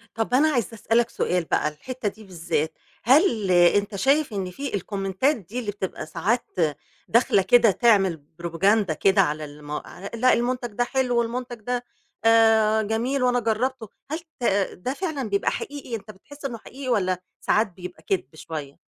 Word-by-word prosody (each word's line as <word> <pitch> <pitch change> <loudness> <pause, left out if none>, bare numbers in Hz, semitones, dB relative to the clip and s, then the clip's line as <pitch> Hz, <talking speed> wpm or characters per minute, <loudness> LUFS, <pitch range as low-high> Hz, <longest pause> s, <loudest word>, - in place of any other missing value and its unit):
طَب 225 +2 -2
أنا 285 +5 +5
عايزة 240 - -1
أسأل 225 +1 0
لك 235 -1 +3
سؤال 180 -5 0
بقى، 150 - +1
الحتّة 220 +11 -5
دي 215 +2 -15
بالذّات، 165 -4 -2 0.3
هل 240 - +4
أنت 180 +4 +4
شايف 275 +4 +2
إن 190 -2 -3
في 275 +8 -5
الكومنتات 195 - 0
دي 220 +3 -7
اللي 220 -4 -3
بتبقى 195 -2 -5
ساعات 185 +10 -1 0.6
داخلة 230 -4 +4
كده 225 +3 +5
تعمل 195 - +3 0.2
propaganda 190 +2 +2
كده 195 +5 +4
على 155 -3 -1
الم 145 0 -11
على 180 +5 -6
لأ، 255 +2 +4
المنتج 245 0 -1
ده 245 - +1
حلو، 250 -1 0
والمنتج 240 +1 -3
ده 245 +2 -2 0.4
آآ 225 -1 +5
جميل، 235 +5 -1
وأنا 245 0 +3
جرّبته، 230 0 -1 0.2
هل 315 - -1 0.2
ت - - -8 0.3
ده 250 +9 -4
فعلًا 290 - -3
بيبقى 200 0 +1
حقيقي، 280 -4 -5
أنت 215 -1 -8
بتحس 285 +9 -14
إنه 240 -4 -3
حقيقي، 260 +4 -8
والّا 185 -6 +1 0.2
ساعات 215 +1 +2
بيبقى 180 0 -10
كدب 165 -7 -2
شوية؟ 155 -4 -7
220 Hz, 170 wpm, -24 LUFS, 185-245 Hz, 0.6 s, أنا